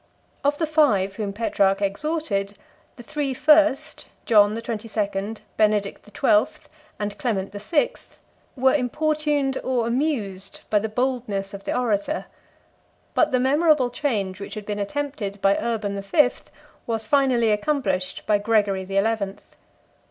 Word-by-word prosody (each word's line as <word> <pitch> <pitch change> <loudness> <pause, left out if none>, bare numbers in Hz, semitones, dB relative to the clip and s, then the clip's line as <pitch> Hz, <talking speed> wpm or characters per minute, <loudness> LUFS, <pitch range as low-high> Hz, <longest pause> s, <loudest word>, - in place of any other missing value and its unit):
Of 285 +1 +2
the 320 - 0
five 235 - +2
whom 205 -2 -2
Petrarch 200 -2 +1
exhorted, 200 -2 -2 0.4
the 240 - -11
three 275 +1 -3
first, 300 0 +3 0.2
John 210 -2 +5
the 230 - -4
Twenty 225 -1 -4
second, 205 0 -3 0.2
Benedict 210 -2 +1
the - - -15
Twelfth, 210 +1 +1 0.3
and 205 -1 -3
Clement 210 -9 -1
the 205 - -7
Sixth, 335 - -1 0.4
were 265 0 +3
importuned 295 0 0
or 250 -3 0
amused 235 -7 -2
by 210 - +4
the 220 +2 -3
boldness 220 -5 -2
of 200 0 -9
the - - -1
orator; 245 +5 -1 0.9
but - - +3
the 255 - +1
memorable 280 -1 +3
change 205 -8 -2
which - - -7
had 210 -1 -7
been 210 0 -3
attempted 205 -2 -3
by 195 0 +3
Urban 220 -4 -2
the 200 - -4
Fifth 250 +6 +1 0.4
was 225 -2 -2
finally 255 -4 +3
accomplished 205 -6 -1
by 210 -1 +3
Gregory 205 -3 +1
the 195 +1 -3
Eleventh. 200 -1 -1
220 Hz, 145 wpm, -23 LUFS, 200-270 Hz, 0.9 s, John